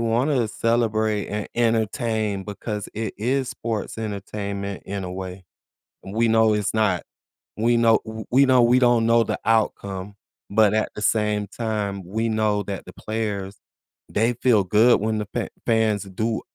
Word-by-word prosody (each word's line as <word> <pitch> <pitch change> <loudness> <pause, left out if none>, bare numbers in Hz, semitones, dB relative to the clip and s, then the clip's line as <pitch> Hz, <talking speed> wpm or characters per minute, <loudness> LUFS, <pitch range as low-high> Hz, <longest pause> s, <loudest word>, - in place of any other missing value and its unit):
wanna 120 +2 +1
celebrate 110 -2 0
and 105 0 -3
entertain 110 -3 0
because 105 0 -5
it 110 -1 -3
is 130 +4 0
sports 110 -3 -4
entertainment, 100 -2 -4
in 100 -1 -4
a 90 - -5
way. 95 0 -7 0.6
We 110 +4 0
know 110 -1 +4
it's 105 -1 -1
not 105 -5 +1 0.5
we 120 +2 +3
know 115 -1 +5
w 110 0 -7
we 135 +3 +6
know 130 -2 +5
we 120 +2 +5
don't 120 -2 +4
know 115 0 +5
the - - -3
outcome, 100 -3 0 0.3
but 105 0 +4
at 110 0 +1
the - - -6
same 105 -1 +1
time, 100 -2 -3
we 110 +5 -1
know 110 -2 +1
that 100 -1 -5
the - - -10
players, 105 -3 -4 0.5
they 115 +3 +1
feel 120 -3 +3
good 110 +6 +5
when 110 0 0
the 105 - -3
pa - - -3 0.2
fans 110 -3 +2
do 110 +4 -2
110 Hz, 160 wpm, -23 LUFS, 100-115 Hz, 0.6 s, we